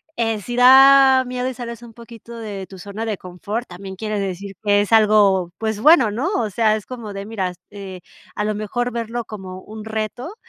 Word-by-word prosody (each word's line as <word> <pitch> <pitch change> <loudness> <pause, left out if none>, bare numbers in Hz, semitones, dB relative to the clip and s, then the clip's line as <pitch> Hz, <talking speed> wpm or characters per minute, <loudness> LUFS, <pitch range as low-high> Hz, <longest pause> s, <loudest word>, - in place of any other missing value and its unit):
eh, 225 -2 -1
sí 240 +4 -6
da 265 +1 +7
miedo 250 +1 -3
y - - -5
sales 235 -1 -7
un 235 -1 -13
poquito 235 0 -12
de 200 -4 -7
tu 190 - -12
zona 205 +4 -6
de 215 -3 -3
confort, 200 +6 -6
también 190 +2 -9
quiere 215 0 -3
decir 195 +1 -5
que 205 0 +3
es 205 - -4
algo, 205 -5 +4
pues 220 -1 -3
bueno, 260 -5 +5
¿no? 250 - -2
O 220 - 0
sea, 215 +1 +2
es 215 - -6
como 230 -5 -8
de, 195 0 -6
mira, 190 -5 -3 0.2
eh, 190 -3 -9 0.3
a 210 - -2
lo 215 0 -1
mejor 240 +4 -3
verlo 235 0 -4
como 190 -3 -9
un 215 0 -10
reto. 220 - -5
215 Hz, 205 wpm, -20 LUFS, 200-235 Hz, 0.3 s, da